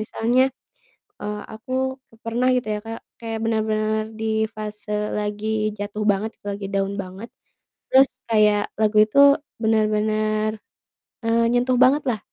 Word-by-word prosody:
misalnya, 230 +4 +1 0.8
eee, 210 0 -4
aku 220 +4 -11 0.5
pernah 240 +3 0
gitu 250 -2 -1
ya 210 - -2
Kak 225 0 -6 0.2
kayak 225 -1 -4
bener-bener 215 -1 0 0.2
di 220 - -3 0.3
fase 210 -1 -7 0.3
lagi 210 0 -3 0.3
jatuh 205 +1 -4
banget 210 +3 -2 0.2
lagi 200 0 -4
down 195 0 0
banget. 190 +5 -10 0.6
Terus 265 +1 +6 0.2
kayak 210 -2 +4 0.2
lagu 215 0 +2
itu 220 +6 -2 0.4
bener-bener, 215 0 +1 0.8
eee, 230 +1 +2
nyentuh 250 +1 +2
bangetlah 260 -3 +2
215 Hz, 120 wpm, -23 LUFS, 210-230 Hz, 0.8 s, Terus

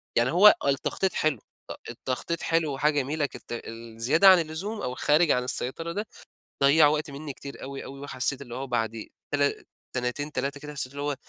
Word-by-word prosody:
يعني 120 +3 +3
هو 195 +5 +7 0.2
آه 140 - +2
التخطيط 180 +7 0
حلو، 155 -7 0 0.3
ط - - -3 0.2
التخطيط 135 +6 -3
حلو. 165 -3 +1
وحاجة 150 +3 +2
جميلة 145 +2 -1
كت - - -9
الزيادة 115 - +1
عن 185 -2 +8
اللزوم، 175 +7 -3
أو 125 - -3
الخارج 150 +4 +3
عن 125 - +2
السيطرة 150 +6 -2
ده، 205 +3 -4 0.6
ضيّع 150 +2 +7
وقت 150 0 -1
منّي 140 0 -6
كتير 140 +1 -10
أوي 135 0 -6
أوي 135 +1 -9
وحسّيت 135 0 -2
اللي 120 -3 -8
هو 135 +1 -4
بعد 115 -2 -2 0.3
تلا 145 -1 +1 0.3
سنتين، 130 +5 -2
3 140 +1 -3
كده 150 0 -8
حسيت 130 -2 -2
اللي 140 0 -6
هو، 145 - 0
هو - - -3
140 Hz, 195 wpm, -27 LUFS, 130-155 Hz, 0.6 s, عن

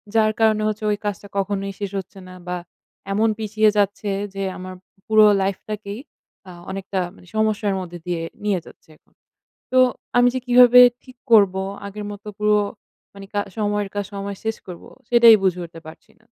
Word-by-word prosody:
যার 215 -1 +4
কারণে 215 -1 +3
হচ্ছে 215 0 -3
ওই 205 - 0
কাজটা 205 0 -4
কখনোই 195 0 -2
শেষ 200 -2 -4
হচ্ছে 190 +1 -11
না। 185 - -11
বা 180 0 -2 0.6
এমন 220 +3 +2
পিছিয়ে 215 0 +2
যাচ্ছে 205 +1 0 0.3
যে 195 - -3
আমার 185 0 -8 0.3
পুরো 215 -1 +6 0.2
লাইফটাকেই 200 +2 -4 0.5
আ - - -9 0.2
অনেকটা 195 0 -4 0.2
মানে 180 - -18
সমস্যার 215 -2 +1
মধ্যে 175 -1 -8
দিয়ে 175 -2 -2 0.2
নিয়ে 200 -3 +1
যাচ্ছে - - -17
এখন। - - -38 0.6
তো - - +7 0.4
আমি 245 0 +6
যে 255 - -1
কিভাবে 245 0 +7 0.2
ঠিক 255 -1 -15 0.2
করব, 200 -4 +6 0.3
আগের 205 +1 -7
মতো 205 +1 -10
পুরো 210 0 +3 0.6
মানে 195 0 -10
কা 205 - +1 0.2
সময়ের 205 -1 -1
কাজ 205 -1 -2
সময়ে 200 0 -5
শেষ 220 0 -1
করব? 180 -2 -10 0.3
সেটাই 235 -2 +8
বুঝে 180 -1 +1
উঠতে 165 -1 -12
পারছি 160 - -13
না। - - -28
205 Hz, 170 wpm, -21 LUFS, 195-215 Hz, 0.6 s, সেটাই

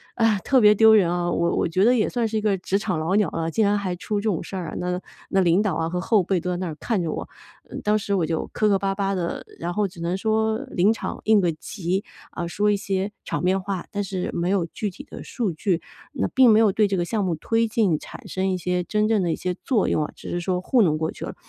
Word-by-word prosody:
哎 230 - +2
呀， 210 -3 +3
特 260 +2 +3
别 210 0 +7
丢 220 +1 +6
人 180 -5 +4
啊。 175 0 -1
我 170 0 +1
我 - - +1
觉 185 +4 +1
得 245 +3 +5
也 215 - +2
算 240 -2 -1
是 220 0 -2
一 - - 0
个 205 -2 +1
职 195 +2 -1
场 185 -6 -2
老 165 +4 -1
鸟 205 -6 +2
了， 165 0 -2
竟 220 +2 +2
然 205 +1 +2
还 190 -3 -2
出 205 +1 -2
这 - - -12
种 175 - -1
事 195 - -8
儿 175 -4 -4
啊， - - -7
那 180 0 -2 0.3
那 195 - +2
领 175 +3 +3
导 200 -7 0
啊 165 0 -1
和 180 +1 -2
后 200 0 +2
辈 185 0 0
都 180 +2 -4
在 180 - -1
那 185 -1 -3
儿 155 - -5
看 220 -6 -1
着 160 -2 -2
我， - - -5 0.4
呃， - - -7
当 210 +1 +3
时 200 0 -3
我 170 -4 +1
就 160 0 -2
磕 215 -1 +2
磕 195 -1 +3
巴 195 0 -1
巴 195 -1 -1
的， 175 -2 -3
然 175 +1 -3
后 210 +1 +1
只 175 -2 -14
能 175 +3 -1
说 220 +1 +1
临 200 +5 +3
场 - - -5
应 215 -1 +5
个 175 -2 +2
急， 185 +3 -3 0.3
啊， 175 - -4
说 210 +4 +1
一 205 - +1
些 195 +1 -2
场 - - -3
面 190 +1 +2
话， 190 -1 -4
但 205 - -2
是 185 -2 -3
没 175 +1 -1
有 190 -4 +1
具 210 +4 -4
体 275 - -11
的 - - -10
数 225 -7 -2
据， 165 +2 -1 0.3
那 260 - -1
并 260 -3 +5
没 215 0 +6
有 210 -3 +4
对 210 +1 +2
这 195 - -1
个 175 - +1
项 210 +1 -1
目 170 -3 0
推 225 +7 0
进 210 -8 +2
产 - - -11
生 190 0 -2
一 185 - 0
些 180 +1 -1
真 210 0 +1
正 215 -3 +3
的 170 - 0
一 - - 0
些 180 - -3
作 230 -7 +1
用 150 - +1
啊， - - -8
只 - - -9
是 175 - -2
说 180 0 -1
糊 240 +5 +2
弄 155 -5 +3
过 160 0 -2
去 - - -7
了。 - - -7
195 Hz, 315 characters per minute, -23 LUFS, 175-210 Hz, 0.4 s, 别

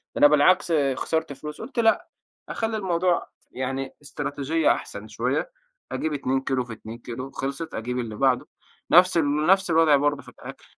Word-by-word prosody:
ده - - -2
أنا 145 - +9
بالعكس 150 +5 +4 0.2
خسرت 160 +1 -2
فلوس 150 +2 -8
قُلت 260 -3 -5
لأ. 225 -1 +2 0.4
أخلّي 225 -1 -2
الموضوع 180 -3 0 0.2
يعني 135 +1 -4
إستراتيجية 145 +2 0
أحسن 100 +1 -4
شوية. 120 - -2 0.4
أجيب 160 - -2
2 135 -2 -1
كيلو 135 -1 -1
في 120 - -8
2 110 +1 -9
كيلو. 125 +3 -7
خلصت، 140 +5 -5
أجيب 125 +3 -3
اللي 115 -3 -4
بعده. 130 +1 +1 0.4
نفس 180 0 +6
ال 150 -1 +1
نفس 190 0 +4
الوضع 160 -2 +5
برضه 145 0 +1
في - - -13
الأكل. - - -12
145 Hz, 165 wpm, -25 LUFS, 130-165 Hz, 0.4 s, أنا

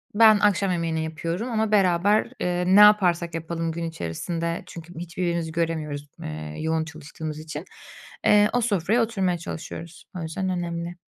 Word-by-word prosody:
ben 215 -1 +7
akşam 200 -2 +2
yemeğini 165 -2 -1
yapıyorum 165 +8 -3
ama 220 -1 0
beraber, 200 +1 +4 0.2
ııı, 180 +1 +2
ne - - +8
yaparsak 180 -5 +5
yapalım 165 0 -3
gün 170 +1 -4
içerisinde 165 - -3
çünkü 170 +1 -10
hiç 170 -1 -9
birbirimizi 170 -3 -1
göremiyoruz, 160 -3 -2
ııı, 75 0 -6
yoğun 160 0 0
çalıştığımız 155 0 -7
için, 155 +1 -7 0.6
ııı, 210 0 +6
o 245 - +2
sofraya 215 0 +1
oturmaya 195 -6 0
çalışıyoruz. 165 0 -8
O - - -4
yüzden 175 +4 -3
önemli. 175 -1 -3
170 Hz, 150 wpm, -25 LUFS, 160-190 Hz, 0.6 s, ne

